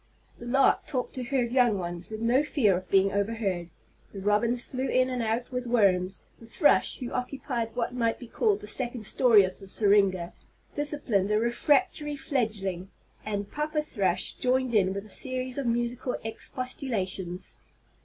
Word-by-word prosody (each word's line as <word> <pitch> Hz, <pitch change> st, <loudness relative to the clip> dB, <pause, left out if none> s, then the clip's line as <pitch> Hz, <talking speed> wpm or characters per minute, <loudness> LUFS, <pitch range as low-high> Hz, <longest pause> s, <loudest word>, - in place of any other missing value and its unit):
The 240 Hz, -, -8 dB
lark 270 Hz, +2 st, +3 dB
talked 255 Hz, -3 st, -3 dB
to 255 Hz, -, -3 dB
her 260 Hz, 0 st, +1 dB
young 240 Hz, -3 st, +2 dB
ones 175 Hz, -1 st, -5 dB
with 220 Hz, 0 st, -6 dB
no 240 Hz, +4 st, +3 dB
fear 260 Hz, -, +2 dB
of 185 Hz, 0 st, -6 dB
being 195 Hz, 0 st, +4 dB
overheard; 200 Hz, -4 st, -2 dB, 0.4 s
the 200 Hz, -, -8 dB
robins 230 Hz, +5 st, +1 dB
flew 260 Hz, +1 st, -3 dB
in 255 Hz, 0 st, +2 dB
and 250 Hz, -1 st, -2 dB
out 230 Hz, +3 st, -2 dB
with 250 Hz, -1 st, -3 dB
worms; 195 Hz, -5 st, +2 dB
the 230 Hz, -, -13 dB
thrush, 295 Hz, +6 st, +2 dB
who 250 Hz, -3 st, -6 dB
occupied 250 Hz, -3 st, -3 dB
what 245 Hz, 0 st, -2 dB
might 230 Hz, -2 st, 0 dB
be 245 Hz, -, -10 dB
called 415 Hz, -, 0 dB
the -, -, -8 dB
second 240 Hz, +1 st, -3 dB
story 220 Hz, -1 st, +5 dB
of 185 Hz, 0 st, -1 dB
the 195 Hz, -, -10 dB
syringa, 195 Hz, -3 st, +2 dB, 0.4 s
disciplined 290 Hz, -10 st, +1 dB
a 210 Hz, -, +2 dB
refractory 290 Hz, -, +1 dB
fledgling, 210 Hz, -10 st, -2 dB, 0.3 s
and 205 Hz, -1 st, -4 dB
papa 300 Hz, +1 st, -1 dB
thrush 190 Hz, -, -1 dB
joined 255 Hz, -1 st, 0 dB
in 195 Hz, -3 st, +3 dB
with 200 Hz, +1 st, -5 dB
a -, -, -14 dB
series 255 Hz, +2 st, 0 dB
of 270 Hz, -, -2 dB
musical 240 Hz, +2 st, -1 dB
expostulations. 220 Hz, -, -3 dB
230 Hz, 165 wpm, -27 LUFS, 200-255 Hz, 0.4 s, story